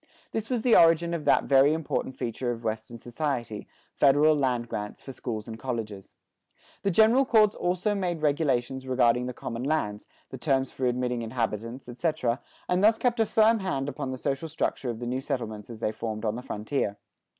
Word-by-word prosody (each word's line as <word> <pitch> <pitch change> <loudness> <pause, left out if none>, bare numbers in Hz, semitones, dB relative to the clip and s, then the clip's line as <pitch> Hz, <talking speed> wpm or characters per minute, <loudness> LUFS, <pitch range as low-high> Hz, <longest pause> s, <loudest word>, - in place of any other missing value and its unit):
This 220 0 -3
was 245 -4 -1
the 245 - +5
origin 165 +1 +5
of 165 -3 -3
that - - +4
very 140 +2 +5
important 155 -4 -2
feature 120 +2 -3
of 115 0 -6
Western 110 +1 -4
society, 120 -3 -4 0.3
federal 145 +2 +5
land 125 -4 0
grants 105 -2 -5
for 135 - -9
schools 115 -4 -5
and 110 -1 -7
colleges.[74:1] 110 -7 -8
The 200 - +1
General 220 +7 +5
Courts 215 -5 +4
also 180 +4 0
made 175 -5 -2
regulations 135 -3 0
regarding 125 -1 +2
the 125 - -4
common 115 0 -5
lands, 120 -8 -1 0.2
the 130 - -7
terms 135 -3 +1
for 130 - -1
admitting 125 -1 -1
inhabitants, 115 +1 -3
etc., 125 -1 -1 0.3
and 180 +2 +1
thus 220 +1 +5
kept 240 -1 0
a 225 - +3
firm 220 +2 +4
hand 140 -9 -2
upon 145 -2 -4
the 130 - -4
social 135 +5 -2
structure 145 -4 -2
of 115 - -3
the 120 - -5
new 125 +2 -2
settlements 115 -7 -4
as 115 -1 -9
they 110 - 0
formed 110 0 -5
on 105 0 0
the 125 - -5
frontier. 105 -3 -2
130 Hz, 190 wpm, -27 LUFS, 115-160 Hz, 0.3 s, the